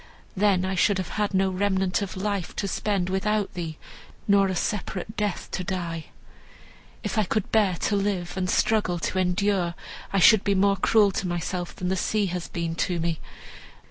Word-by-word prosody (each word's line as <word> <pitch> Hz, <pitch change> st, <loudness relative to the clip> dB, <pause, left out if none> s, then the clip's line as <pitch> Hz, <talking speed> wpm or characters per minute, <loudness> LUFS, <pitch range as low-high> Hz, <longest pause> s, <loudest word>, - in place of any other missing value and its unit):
Then 195 Hz, -2 st, +3 dB
I 190 Hz, -, -1 dB
should 190 Hz, +2 st, +3 dB
have 185 Hz, -3 st, -3 dB
had 210 Hz, -1 st, -1 dB
no 190 Hz, 0 st, +2 dB
remnant 190 Hz, 0 st, +1 dB
of 195 Hz, -2 st, -4 dB
life 200 Hz, -3 st, -2 dB
to 200 Hz, -, -2 dB
spend 195 Hz, -1 st, -1 dB
without 205 Hz, +2 st, 0 dB
thee, 165 Hz, -3 st, -5 dB, 0.5 s
nor 200 Hz, -1 st, +5 dB
a 185 Hz, -, -2 dB
separate 205 Hz, +2 st, -3 dB
death 210 Hz, -3 st, -2 dB
to 185 Hz, -, -2 dB
die. 170 Hz, -3 st, -3 dB, 1.0 s
If 220 Hz, -, -1 dB
I -, -, +4 dB
could 205 Hz, +1 st, -2 dB
bear 205 Hz, -5 st, +3 dB
to 205 Hz, -, +1 dB
live 195 Hz, -3 st, -1 dB
and 185 Hz, -1 st, -1 dB
struggle 205 Hz, -5 st, +2 dB
to 185 Hz, +2 st, -1 dB
endure, 180 Hz, -1 st, +1 dB, 0.4 s
I 195 Hz, -, +1 dB
should 205 Hz, +2 st, +7 dB
be 200 Hz, -1 st, +2 dB
more 195 Hz, +1 st, +3 dB
cruel 205 Hz, +1 st, +4 dB
to 190 Hz, 0 st, -2 dB
myself 175 Hz, +1 st, -3 dB
than 180 Hz, -, -3 dB
the 190 Hz, -, +1 dB
sea 210 Hz, +3 st, 0 dB
has 180 Hz, -2 st, -3 dB
been 170 Hz, -1 st, -3 dB
to 175 Hz, 0 st, 0 dB
me. 165 Hz, -1 st, -1 dB
190 Hz, 185 wpm, -25 LUFS, 180-205 Hz, 1.0 s, should